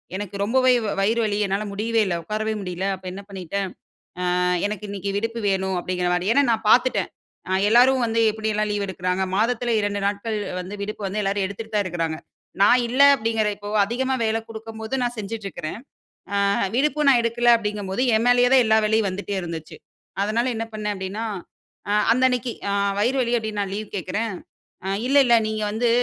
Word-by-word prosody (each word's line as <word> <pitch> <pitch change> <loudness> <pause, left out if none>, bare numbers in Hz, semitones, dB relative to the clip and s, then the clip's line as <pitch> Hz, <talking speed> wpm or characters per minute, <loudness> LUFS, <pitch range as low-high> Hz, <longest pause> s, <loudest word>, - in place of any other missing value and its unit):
எனக்கு 200 0 -5
ரொம்பவே 255 +4 +3 0.3
வயிறு 220 +4 +2
வலி 205 -1 -1
என்னால 195 +2 -1
முடியவே 225 +2 +1
இல்ல. 180 -3 -1
உட்காரவே 215 +2 -2
முடியல. 180 0 -4
அப்ப 185 - -19
என்ன 195 - -7
பண்ணிட்டேன். 195 0 -4 0.7
ஆ - - +1 0.3
எனக்கு 210 0 -5
இன்னக்கி 200 0 -4
விடுப்பு 230 +1 -3
வேணும். 190 -1 0
அப்பிடிங்கிறமாரியே 180 +2 0
ஏன்னா 285 +1 +5
நான் 225 -1 -2
பார்த்துட்டேன். 255 +2 +3 0.4
அ - - 0 0.2
எல்லாரும் 250 +3 +5
வந்து 230 0 +1
எப்பிடியெல்லாம் 215 -1 -1
லீவு 205 -1 -1
எடுக்குறாங்க. 185 0 -1
மாதத்தில 235 +2 +1
2 205 0 -1
நாட்கள் 210 +2 -2 0.2
வந்து 185 +3 -7
விடுப்பு 205 0 -4
வந்து 200 +3 -2
எல்லாரும் 195 0 0
எடுத்துட்டு 215 +3 -8
தான் 205 - +2
இருக்குறாங்க. 165 -3 -2 0.5
நான் 245 +5 +6
இல்ல 255 +3 -2
அப்பிடிங்கிற 225 -4 0
இப்ப 205 0 -9 0.2
அதிகமா 260 +4 -1
வேலை 220 0 +1
கொடுக்கும்போது, 220 +1 -7
நான் 245 0 -2
செஞ்சுட்டு 215 0 -5
இருக்கிறேன். 165 0 -6 0.6
ஆ - - +2 0.4
விடுப்பும் 300 +2 +1
நான் 250 -3 +5
எடுக்கல. 240 +1 +3
அப்பிடிங்கம்போது 210 -1 -3
என் 220 - +1
மேலயேதான் 245 +1 +5
எல்லா 220 0 +4
வேலையும் 220 -1 +2
வந்துட்டே 200 +1 -4
இருந்துச்சு. 165 -2 -7 0.5
அதனால 220 +4 0
என்ன 225 - -2
பண்னேன் 210 -1 -2
அப்பிடின்னா, 195 +3 -4 0.7
அ - - +2 0.2
அந்த 255 +2 +2
அன்னக்கி 250 -1 -2 0.2
அ - - 0 0.3
வயிறு 250 +6 +1
வலி 240 0 0
அப்பிடின்னு 215 -2 -4
நான் 195 - -4
லீவு 215 0 -5
கேக்கிறேன். 200 +4 -2 0.5
அ - - -2 0.2
இல்ல 275 +2 +2
இல்ல 240 -1 +6
நீங்க 215 0 -3
வந்து. 235 +3 +1
215 Hz, 180 wpm, -23 LUFS, 195-230 Hz, 0.7 s, நான்